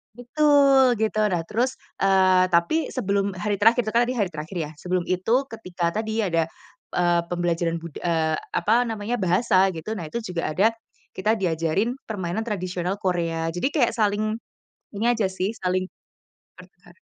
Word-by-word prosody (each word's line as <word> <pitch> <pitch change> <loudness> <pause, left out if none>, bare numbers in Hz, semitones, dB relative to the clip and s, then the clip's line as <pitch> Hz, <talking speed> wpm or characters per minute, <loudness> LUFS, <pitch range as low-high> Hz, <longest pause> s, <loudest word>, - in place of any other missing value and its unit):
Betul, 270 -1 +4
gitu. 215 -1 +1
Nah 175 - +1
terus, 245 +4 -1 0.2
eee, 190 -1 +5
tapi 175 - +2
sebelum 200 -4 0
hari 200 +3 -2
terakhir, 225 +5 +4
itu - - 0
kan 235 - +5
tadi 245 - -1
hari 205 - +2
terakhir 160 +4 -7
ya, 155 -2 -3
sebelum 180 +4 -2
itu 225 +9 +1
ketika 185 -7 -4
tadi 220 +1 -2
ada, 165 -6 0 0.4
eee, 175 -1 +2
pembelajaran 170 -1 0
bud 165 -2 -10
eee, 160 -2 0
apa 220 +10 +1
namanya, 225 0 -3
bahasa 190 -1 +2
gitu, 175 +6 -5
nah 185 - -5
itu 235 - -2
juga 180 -8 -3
ada, 195 +7 +3 0.5
kita 215 +4 +1
diajarin 175 +6 0
permainan 195 -1 -3
tradisional 185 -4 -3
Korea. 165 -3 -1
Jadi 265 +11 0
kayak 245 -7 +2
saling, 215 0 0 0.6
ini 220 - -1
aja 225 -3 0
sih, 190 +3 -2
saling 185 0 0 0.7
bertukar - - -18
195 Hz, 160 wpm, -24 LUFS, 175-225 Hz, 0.7 s, eee